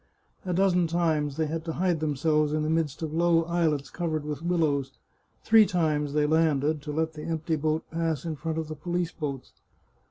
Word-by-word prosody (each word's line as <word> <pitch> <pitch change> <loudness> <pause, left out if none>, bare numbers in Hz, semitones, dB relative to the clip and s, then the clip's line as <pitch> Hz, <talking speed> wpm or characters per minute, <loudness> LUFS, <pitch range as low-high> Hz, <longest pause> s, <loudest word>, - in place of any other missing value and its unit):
A - - 0
dozen 180 -1 +3
times 160 -4 0
they 160 - +1
had 160 +1 -3
to 165 - -3
hide 175 -1 0
themselves 150 0 +1
in 155 0 0
the 155 - 0
midst 160 -2 -1
of 155 -1 -3
low 165 0 +3
islets 160 -4 0
covered 160 -4 -2
with 150 0 -4
willows; 155 -6 0 0.5
three 225 -1 +7
times 150 -5 0
they 150 0 +2
landed, 155 -1 +2
to 150 - -6
let 160 +1 -1
the 150 - -8
empty 160 0 -1
boat 155 +1 0
pass 165 -3 -1
in 160 -2 -3
front 160 +3 -4
of 160 -1 -2
the 155 - -6
police 175 +2 -2
boats. 140 -5 -5
160 Hz, 195 wpm, -27 LUFS, 150-165 Hz, 0.5 s, three